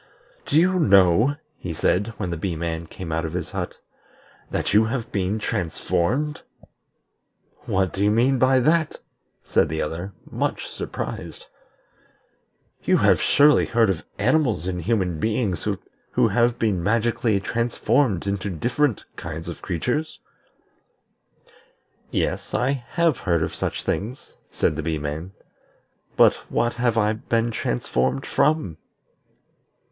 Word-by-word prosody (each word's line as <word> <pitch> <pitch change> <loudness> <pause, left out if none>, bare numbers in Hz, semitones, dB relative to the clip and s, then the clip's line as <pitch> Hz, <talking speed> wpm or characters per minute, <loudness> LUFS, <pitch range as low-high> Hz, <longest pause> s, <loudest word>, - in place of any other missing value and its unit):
"Do - - +2
you 185 +2 +3
know," 100 - +5 0.2
he 85 -3 -5
said, 105 +7 0
when 90 - -3
the - - -1
Bee 85 +1 -2
man 80 0 -3
came 85 -1 -7
out 80 +1 -1
of 80 0 -4
his 90 -2 -4
hut, - - -4 0.7
"that - - -1
you 110 +2 +6
have 115 0 -3
been 100 +1 0
transformed?" 110 - -1 1.3
"What 95 -1 +1
do 100 - -1
you 105 - +4
mean 125 +5 +3
by 130 0 +4
that?" 155 +3 +2 0.5
said - - +2
the 80 +1 -3
other, 85 +6 -5
much - - -2
surprised. - - -6 1.4
"You - - +3
have - - +4
surely 145 +1 +5
heard 115 -4 +3
of 85 - -4
animals 120 - +2
and 90 -1 -2
human 90 -4 0
beings 105 -5 -1 0.5
who - - +4
have 120 0 +2
been 105 -6 0
magically 115 +1 +1
transformed 115 - 0
into 100 0 -2
different 120 - 0
kinds 80 -1 -6
of 85 - -7
creatures?" 125 - -2 1.9
"Yes, - - -2
I 125 +3 +2 0.2
have 170 -6 +1
heard 85 -4 +1
of - - -2
these - - -2
things," 120 +7 -4 0.2
said - - 0
the - - -1
Bee 80 0 -1
man; 75 +5 -5 0.8
"but - - +6
what 120 0 +1
have 120 -2 0
I 105 -1 +3
been 115 +1 -1
transformed 65 - -1
from?" 140 - +1
105 Hz, 135 wpm, -23 LUFS, 85-120 Hz, 1.9 s, you